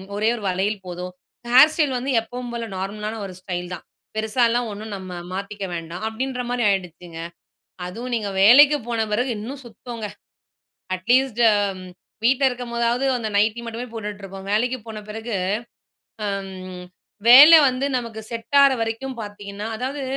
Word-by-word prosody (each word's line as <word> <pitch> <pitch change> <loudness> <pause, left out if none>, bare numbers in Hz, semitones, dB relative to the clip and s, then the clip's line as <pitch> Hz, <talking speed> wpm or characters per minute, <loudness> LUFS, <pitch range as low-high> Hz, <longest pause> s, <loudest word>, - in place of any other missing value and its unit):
ஒரே 215 +2 +2
ஒரு 230 - -8
வளையல் 190 +2 -1
போதும். 180 +1 -6 0.4
ஹேர் 265 +5 +8
ஸ்டைல் 295 -5 +1
வந்து 260 +3 -2
எப்பவும் 245 +2 -7
போல 235 -1 -3
நார்மலான 210 +3 -4
ஒரு 190 - -8
ஸ்டைல் 180 -1 -5
தான். 175 - -8 0.3
பெருசாலாம் 230 +2 +1
ஒண்ணு 205 +1 -7
நம்ம 190 -1 -8 0.2
மாத்திக்க 200 +1 -5
வேண்டாம்." 165 +3 -6
அப்படீன்ற 250 +3 -3
மாரி 245 -2 0
ஆயிடுச்சுங்க. 175 -3 -4 0.7
அதுவும் 235 +7 -6
நீங்க 210 -3 -2
வேலைக்கு 285 +7 +8
போன 230 -2 0
பிறகு 245 +5 0
இன்னும் 265 +6 -7
சுத்தம்ங்க. 230 -1 -7 0.9
அட்லீஸ்ட் 240 +5 +2 0.8
வீட்ல 265 +3 +3
இருக்கும்போதாவது, 240 0 -1
அந்த 225 -3 -3
நைட்டி 215 +3 +2
மட்டுமே 230 +2 -5
போட்டுட்ருப்போம். 200 -3 -7
வேலைக்கு 245 +5 +1
போன 220 -1 -7
பிறகு, 220 +2 -5 0.9
அம் 195 -1 -3 0.8
வேல 285 +7 +11 0.2
வந்து 255 +2 -2
நமக்கு 230 -3 -6
செட் 230 +4 -5
ஆற 275 - +6
வரைக்கும் 230 +3 -4
பார்த்தீங்கன்னா 205 0 -7
அதாவது 270 +4 -4
225 Hz, 140 wpm, -22 LUFS, 200-245 Hz, 0.9 s, வேல